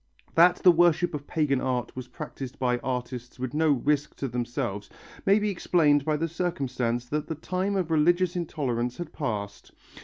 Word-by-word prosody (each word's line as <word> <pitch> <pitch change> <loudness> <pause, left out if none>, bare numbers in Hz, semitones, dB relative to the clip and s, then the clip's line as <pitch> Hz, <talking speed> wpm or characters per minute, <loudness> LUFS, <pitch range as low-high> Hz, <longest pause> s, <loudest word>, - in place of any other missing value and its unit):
That 175 +2 +6
the 180 - +9
worship 175 0 +3
of 145 -1 -5
pagan 140 -4 +1
art 125 -2 -2
was 130 -1 -6
practised 135 -1 -7
by 125 -1 +1
artists 125 -1 -4
with 130 -1 -4
no 160 +1 +2
risk 145 +2 +1
to 135 - -3
themselves 120 -4 -3 0.4
may 200 +1 +6
be 210 -1 0
explained 150 -6 +2
by 155 -1 +1
the 165 +2 -1
circumstance 130 -8 -2
that 150 +4 -3
the 160 - -3
time 185 +6 -2
of 180 -4 -1
religious 175 +3 +3
intolerance 125 -8 -2
had 175 -3 -6
passed. 105 -7 -4
145 Hz, 175 wpm, -27 LUFS, 125-170 Hz, 0.4 s, the